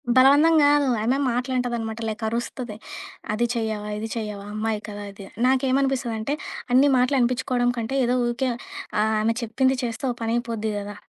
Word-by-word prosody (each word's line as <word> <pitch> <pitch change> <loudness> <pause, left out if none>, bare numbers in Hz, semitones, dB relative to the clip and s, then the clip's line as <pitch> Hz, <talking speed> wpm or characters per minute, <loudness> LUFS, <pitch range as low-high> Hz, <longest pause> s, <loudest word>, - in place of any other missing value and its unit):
బలవంతం 285 +5 +6
గాదు. 290 -1 +4 0.2
ఆమె 250 +4 +2
మాటలంటదనమాట 240 -2 -2
లైక్ 220 +1 -4
అరుస్తది. 235 0 -4 0.6
అది 235 +3 +1
చెయ్యవా? 215 -2 -2
ఇది 220 - -3
చెయ్యవా? 210 -3 -4
అమ్మాయి 215 0 -1
కదా 205 0 -7
ఇది. 195 0 -11 0.2
నాకేమనిపిస్తదంటే 260 -2 +1 0.4
అన్ని 265 +3 +6
మాటలనిపిచ్చుకోవడం 250 -1 +2
కంటే 235 +3 -2
ఏదో 245 +1 +1
ఊకె 245 +2 -1 0.5
ఆహ్, 220 +1 +2
ఆమె 225 +1 +1
చెప్పింది 260 +3 +1
చేస్తే 230 +1 -4
ఒ - - -3
పనయిపోద్ది 225 -1 -1
గదా. 205 0 -6
235 Hz, 140 wpm, -24 LUFS, 220-260 Hz, 0.6 s, బలవంతం